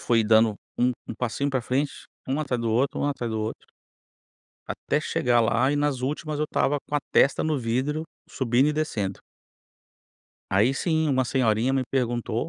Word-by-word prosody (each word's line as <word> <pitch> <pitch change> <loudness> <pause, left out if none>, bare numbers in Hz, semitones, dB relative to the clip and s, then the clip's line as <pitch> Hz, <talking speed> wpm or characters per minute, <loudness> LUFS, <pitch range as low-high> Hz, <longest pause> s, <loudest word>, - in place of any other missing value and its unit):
fui 115 -2 +2
dando 110 0 +4 0.2
um 125 +1 +3 0.2
um 115 - -4
passinho 125 +5 -2
para 130 -2 0
frente, 135 +4 -1 0.3
um 135 +2 -1
atrás 125 -5 -2
do 115 - -1
outro, 125 +5 +1
um - - +1
atrás 125 -5 -2
do 110 - -2
outro 110 - -3 1.1
até - - -2
chegar 120 -1 +1
lá 120 +3 +2
e 145 - 0
nas 145 -3 0
últimas 150 +3 -3
eu 150 - +1
estava 145 -1 0
com 150 - -5
a 145 - +2
testa 135 - +4
no 155 -3 0
vidro, 130 +6 -1 0.3
subindo 130 +2 +2
e - - +1
descendo. 110 -11 -2 1.3
Aí 110 +8 +3
sim, 160 0 0
uma 130 -2 +2
senhorinha 120 -1 +1
me 135 -1 +1
perguntou 120 +1 -1
130 Hz, 180 wpm, -25 LUFS, 115-145 Hz, 1.3 s, dando